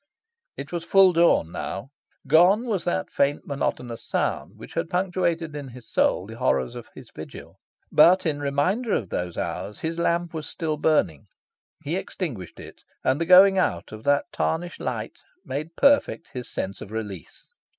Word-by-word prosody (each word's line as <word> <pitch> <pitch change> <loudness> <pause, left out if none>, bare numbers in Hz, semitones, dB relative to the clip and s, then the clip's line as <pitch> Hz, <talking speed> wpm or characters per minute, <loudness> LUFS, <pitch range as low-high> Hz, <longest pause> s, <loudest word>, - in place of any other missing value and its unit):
It - - -7
was 170 -1 -3
full 190 +1 +5
dawn 165 - +3
now. 100 +8 -5 0.4
Gone 180 - +5
was 210 -7 -2
that 175 - -1
faint, 140 +1 +1
monotonous 125 -4 -3
sound - - -2
which - - -11
had 165 0 -2
punctuated 175 -3 -1
in 145 -2 -6
his 125 -2 -12
soul - - +1
the - - -10
horrors 65 -2 +1
of - - -9
his - - -12
vigil. - - -10 0.3
But, 185 +2 +6
in 150 -3 0
reminder 165 - 0
of 100 - -1
those 90 -1 -3
hours, 100 +2 -4
his 165 +1 -3
lamp 170 0 0
was 155 -1 -5
still 155 -2 -3
burning. 155 +1 +1 0.6
He 160 +5 -2
extinguished 150 - -5
it; - - -12 0.2
and 130 +5 +1
the 165 - 0
going 190 +1 +8
out 85 - -1
of 110 0 -9
that 145 0 +3
tarnished 170 +2 -2
light - - -4 0.3
made 155 +5 -5
perfect 280 -11 +3
his 125 -2 -5
sense 95 +1 -4
of - - -8
release. 105 -7 -7
160 Hz, 170 wpm, -25 LUFS, 125-175 Hz, 0.6 s, going